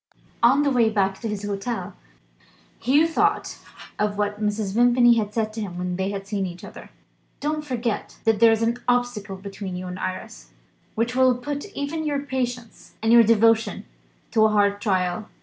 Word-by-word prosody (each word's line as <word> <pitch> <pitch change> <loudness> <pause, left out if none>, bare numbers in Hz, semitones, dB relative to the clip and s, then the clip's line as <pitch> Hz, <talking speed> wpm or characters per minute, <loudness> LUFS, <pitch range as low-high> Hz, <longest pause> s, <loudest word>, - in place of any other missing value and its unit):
On 260 +5 +5
the 285 - +2
way 235 -4 +3
back 195 -3 0
to 230 - -3
his 210 -1 -4
hotel, 205 +4 -4 0.9
Hugh 280 +7 +3
thought 415 +5 0 0.4
of 210 -1 0
what 205 0 -2
Mrs. 210 -1 -1
Vimpany 240 +1 +5
had 215 -3 -1
said 215 0 -2
to 220 - -5
him 185 -4 -6
when 180 0 -3
they 190 +1 -1
had 200 -1 -4
last 195 - -19
seen 200 -3 -1
each 175 0 -10
other: - - -11 0.5
"Don't 305 +1 -2
forget 240 -6 -3
that 225 -2 +2
there 230 0 +7
is 225 0 +1
an 235 +2 0
obstacle 245 -5 0
between 195 -1 -7
you 180 +1 -5
and 180 0 -6
Iris - - -6 0.5
which 230 +2 -1
will 260 -1 +4
put 285 +6 -5
even 305 +3 -3
your 290 -2 -1
patience 245 -4 -5
and 225 +1 +4
your 235 - +9
devotion 225 -1 +3 0.5
to 220 -1 +4
a - - +4
hard 205 -1 +2
trial." 190 0 -1
220 Hz, 185 wpm, -23 LUFS, 200-245 Hz, 0.9 s, your